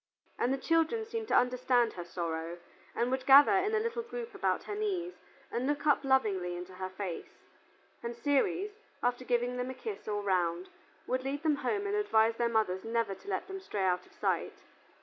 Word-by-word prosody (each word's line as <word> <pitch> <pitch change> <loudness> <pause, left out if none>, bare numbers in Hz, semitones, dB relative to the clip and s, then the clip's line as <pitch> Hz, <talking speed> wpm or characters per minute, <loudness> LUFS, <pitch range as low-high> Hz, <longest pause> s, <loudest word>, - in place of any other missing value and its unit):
And 245 - +2
the 270 - +1
children 330 - +1
seemed 450 0 -4
to - - +2
understand 250 -1 +3
her 175 - -6
sorrow 170 -1 -4 0.4
and 240 +2 0
would 260 0 -2
gather 280 +1 +9
in 405 +3 +2
a - - +3
little 465 +1 -2
group 470 0 -6
about - - 0
her 415 - -5
knees 380 -4 -2 0.4
and 245 +3 -1
look 290 0 -1
up 295 -1 +4
lovingly 205 -10 +2
into 180 +1 -8
her 185 0 -5
face, 185 -2 -6 0.6
and 235 0 -4
Ceres, 285 - +1 0.3
after 245 +1 +1
giving 245 0 0
them 250 +1 -2
a 260 - -5
kiss 415 - -6
all 205 -1 -1
round, 180 -2 0 0.4
would 255 0 -1
lead 280 +3 -3
them 305 -3 +2
home 410 +6 -1
and 405 - -1
advise 225 - +3
their 235 -1 +2
mothers 215 -5 +1
never 230 -2 0
to 190 - -14
let 190 - -2
them 385 0 -5
stray 210 - -3
out 180 -1 +1
of - - -22
sight. - - -1
250 Hz, 200 wpm, -31 LUFS, 195-330 Hz, 0.6 s, gather